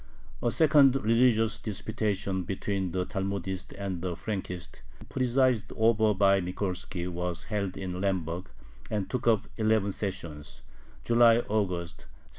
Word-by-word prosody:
A 120 - +2
second 145 -1 +5
religious 115 -2 +3
disputation 100 -2 -2
between 95 +1 -2
the 90 +1 -1
Talmudists 95 -1 -3
and 95 -3 -4
the 90 -1 -2
Frankists, 90 -4 -5 0.3
presided 130 -2 +2
over 110 -1 +3
by 100 0 +4
Mikolski, 90 -1 -3
was 90 0 -3
held 100 -4 -3
in 90 -1 -4
Lemberg, 90 -2 -1 0.4
and 105 -3 -1
took 125 -2 -2
up 110 -3 +3
eleven 110 -2 +2
sessions 85 -7 -6 0.4
(July 120 0 +5
August, 90 -5 -2
1759). - - -23
100 Hz, 125 wpm, -29 LUFS, 90-110 Hz, 0.4 s, second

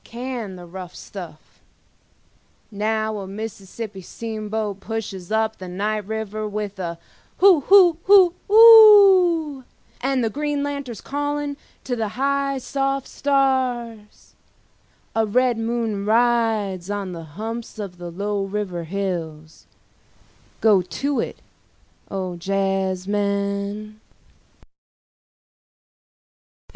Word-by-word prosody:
Can 235 -5 -6
the 180 -1 -10
rough 180 0 -9
stuff… 175 -6 -11 1.1
now 215 +1 -1
a 195 - -7
Mississippi 205 0 -7
steamboat 215 0 -5
pushes 200 -4 -6
up 220 0 0
the 185 - -8
night 205 +3 -3
river 215 -1 -4
with 205 -1 -5
a 170 -2 -4 0.4
hoo 380 -4 +6
hoo 355 +1 +6
hoo 380 -3 +6 0.2
oo… 395 - +7 0.4
and 265 -1 0
the 225 - 0
green 295 +2 -2
lanterns 280 -6 -5
calling 290 0 -3 0.3
to 250 - -2
the 225 -2 -2
high 275 0 0
soft 275 +1 -2
stars… 255 -6 -1 0.8
a 225 -1 +2
red 245 +2 +1
moon 225 -3 -2
rides 220 -4 +1
on 200 -2 -3
the 165 -2 -7
humps 225 +2 -6
of 195 -4 -7
the 175 0 -6
low 200 +3 -2
river 195 -4 -4
hills… 165 -4 -5 0.9
go 210 -4 +5
to 185 - -3
it, - - -3 0.7
O 185 -3 -4
jazzmen. 200 +2 -2
215 Hz, 105 wpm, -22 LUFS, 195-265 Hz, 1.1 s, oo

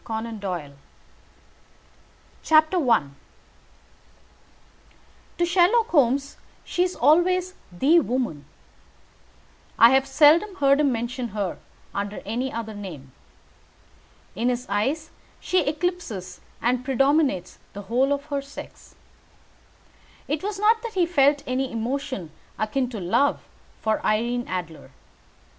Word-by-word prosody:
CONAN 225 0 -5
DOYLE 175 -8 -5 1.8
I 310 - +4 2.3
To 345 - +2
Sherlock 375 +6 +3
Holmes 280 - +2 0.3
she 355 - -2
is 365 0 +1
always 365 +4 +3 0.2
the 280 - +4
woman. 240 - -2 1.3
I 230 +1 +8
have 265 0 +3
seldom 315 +8 +4
heard 280 -4 +3
him 290 -2 +3
mention 240 +1 -3
her 195 -3 -2 0.3
under 200 +1 -4
any 245 +6 -2
other 225 -1 -5
name. 170 -10 -9 1.2
In 235 +5 0
his 250 0 -2
eyes 270 +11 -1 0.3
she 365 - +1
eclipses 300 - -3 0.2
and 250 +1 +1
predominates 270 - +1
the 205 - -8
whole 250 +7 +1
of 285 0 -1
her 280 - 0
sex. 275 +1 -12 1.3
It 295 +1 -2
was 410 0 -4
not 440 +2 +3
that 465 -3 -7
he 360 -2 +3
felt 285 -4 +3
any 260 +1 -2
emotion 230 - -4 0.3
akin 245 +4 -1
to 230 -4 -6
love 190 +11 +1 0.3
for 220 -1 -1
Irene 240 +3 0
Adler. 175 -4 -6
265 Hz, 115 wpm, -24 LUFS, 220-310 Hz, 2.3 s, I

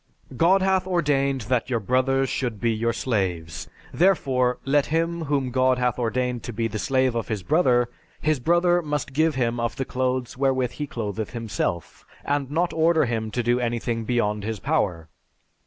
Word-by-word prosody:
"God 185 +8 +4
hath 190 -1 +2
ordained 140 -7 +1
that 120 +3 -1
your 120 -3 +1
brothers 130 +4 +1
should 120 -5 -2
be 115 +2 +1
your 115 +1 0
slaves, 90 -10 -2 0.2
therefore, 135 -9 +2
let 140 +1 +2
him 165 +1 -1
whom 140 -3 0
God 130 0 +3
hath 125 -1 0
ordained 125 +1 -1
to 120 - -4
be 115 +1 -1
the 110 -1 -5
slave 130 0 +1
of 115 -1 -2
his 105 -4 -3
brother, 125 - +3 0.3
his 155 -3 +1
brother 175 +5 +3
must 150 -3 -3
give 155 +1 +2
him 120 -2 0
of 115 0 -1
the 135 - -3
clothes 130 -1 -2
wherewith 130 -2 +1
he 150 +3 -5
clotheth 110 -3 -4
himself, 110 -7 -3 0.2
and 140 -2 -1
not 170 +4 0
order 160 -1 +3
him 110 -2 -2
to 120 +3 -2
do 120 +1 +2
anything 120 -1 -2
beyond 105 -3 0
his 110 0 -3
power.... 95 - -1
125 Hz, 175 wpm, -24 LUFS, 115-145 Hz, 0.3 s, God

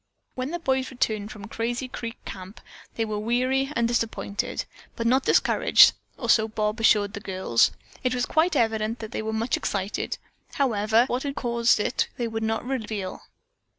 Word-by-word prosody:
When 255 +1 -3
the 345 - -2
boys 265 -5 0
returned 215 -5 -1
from 200 -2 -9
Crazy 235 +3 -3
Creek 230 -2 -6
Camp 190 +2 -8 0.4
they 225 - 0
were 215 -1 -3
weary 255 +5 +1
and 235 0 +2
disappointed, 230 -3 -2 0.3
but 230 - -3
not 260 +3 +3
discouraged, - - +6 0.2
or - - -4
so 220 -1 +4
Bob 215 +1 -2
assured 205 -2 +4
the - - -5
girls. 185 - +2 0.3
It 255 0 +1
was 245 - 0
quite 335 +3 +2
evident 220 0 +1
that 220 -2 -8
they - - -3
were 220 0 -3
much 225 +2 0
excited, 200 +1 -2 0.4
however, 220 -4 +2
but 255 - -6
what 250 - 0
had 280 -1 -3
caused 235 -2 +2
it 210 - 0
they 240 - -1
would 225 0 -4
not 225 +1 -1
reveal. 215 -7 -4
230 Hz, 180 wpm, -25 LUFS, 215-250 Hz, 0.4 s, discouraged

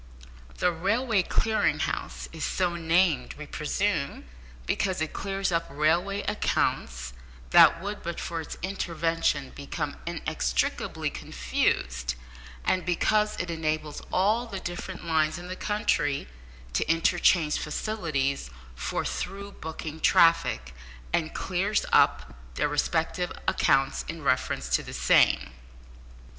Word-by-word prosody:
The 180 - +2
Railway 205 +6 +1
Clearing 220 +4 +1
House - - -3
is - - -5
so 180 -2 0
named, 165 -5 +2
we 150 - -8
presume, 150 +1 -1 0.4
because 190 - 0
it 160 -1 -2
clears 195 -1 -2
up 165 0 0
railway 170 +8 +1
accounts 65 - -1 0.4
that 165 - +8
would, 205 +1 -4
but 170 0 -4
for 165 -1 -3
its 155 - -7
intervention, 165 -6 -1
become 145 +1 -4
inextricably 65 - -1
confused, - - -1 0.5
and 185 - +2
because 210 +4 +2
it 180 -2 -2
enables 155 -2 -2
all 215 +6 +2
the 200 -4 -5
different 175 0 -6
lines 155 -2 +1
in 175 +1 -8
the 185 - -4
country 150 - 0 0.5
to 60 - 0
interchange 165 -1 +3
facilities 150 - -2 0.2
for 65 +2 -3
through 200 +2 -4
booking 160 -1 -7
traffic, 165 - +4 0.4
and 160 -1 0
clears 195 +3 0
up - - +4 0.2
their - - +1
respective 165 +4 0 0.2
accounts 135 -7 +2
in 165 -1 -6
reference 130 - 0
to - - +2
the - - -9
same. - - +4
165 Hz, 120 wpm, -27 LUFS, 150-190 Hz, 0.5 s, that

